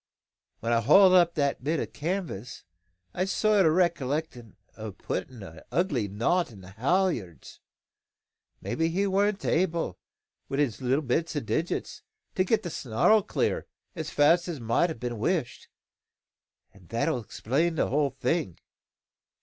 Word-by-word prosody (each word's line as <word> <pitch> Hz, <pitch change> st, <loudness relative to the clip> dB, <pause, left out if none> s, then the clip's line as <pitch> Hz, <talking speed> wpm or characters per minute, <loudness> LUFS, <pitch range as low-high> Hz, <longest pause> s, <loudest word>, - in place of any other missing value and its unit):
When 115 Hz, +1 st, 0 dB
I 115 Hz, -, +3 dB
hauled 190 Hz, -, +7 dB
up 175 Hz, -2 st, +5 dB
that 140 Hz, -3 st, 0 dB
bit 155 Hz, +3 st, 0 dB
o' -, -, -1 dB
canvas, 145 Hz, -, -5 dB, 0.5 s
I've 185 Hz, -, 0 dB
a -, -, -7 dB
sort 205 Hz, -2 st, +3 dB
o' -, -, +5 dB
recollection 155 Hz, -, -1 dB, 0.2 s
o' 110 Hz, -1 st, -6 dB
puttin' 100 Hz, +3 st, -5 dB
a 80 Hz, -3 st, -11 dB
ugly 145 Hz, -, 0 dB
knot 120 Hz, -, 0 dB
on 100 Hz, -4 st, -13 dB
the 90 Hz, +1 st, -12 dB
haulyards. 120 Hz, -, -1 dB, 1.0 s
Maybe 165 Hz, 0 st, -1 dB
he 190 Hz, +4 st, 0 dB
warn't 200 Hz, +1 st, +1 dB
able, 165 Hz, -, 0 dB, 0.5 s
wi' 135 Hz, -, -2 dB
his 135 Hz, -5 st, 0 dB
little 130 Hz, +4 st, +1 dB
bits 160 Hz, +6 st, -1 dB
o' -, -, +1 dB
digits, 155 Hz, +7 st, -3 dB, 0.3 s
to 185 Hz, -, +2 dB
get 215 Hz, +4 st, +1 dB
the 175 Hz, -, -4 dB
snarl 135 Hz, -, +3 dB
clear, -, -, -1 dB, 0.3 s
as 160 Hz, -2 st, -4 dB
fast 165 Hz, +5 st, +3 dB
as 165 Hz, -5 st, -4 dB
mout 115 Hz, +9 st, +1 dB
a' 160 Hz, -, -4 dB
been 120 Hz, -1 st, -5 dB
wished; 160 Hz, -, -1 dB, 1.1 s
an' 95 Hz, -3 st, -19 dB
that'll 115 Hz, +4 st, 0 dB
explain 140 Hz, -, -1 dB
the -, -, 0 dB
whole 145 Hz, +1 st, +2 dB
thing. 160 Hz, -, -1 dB
150 Hz, 150 wpm, -27 LUFS, 115-175 Hz, 1.1 s, hauled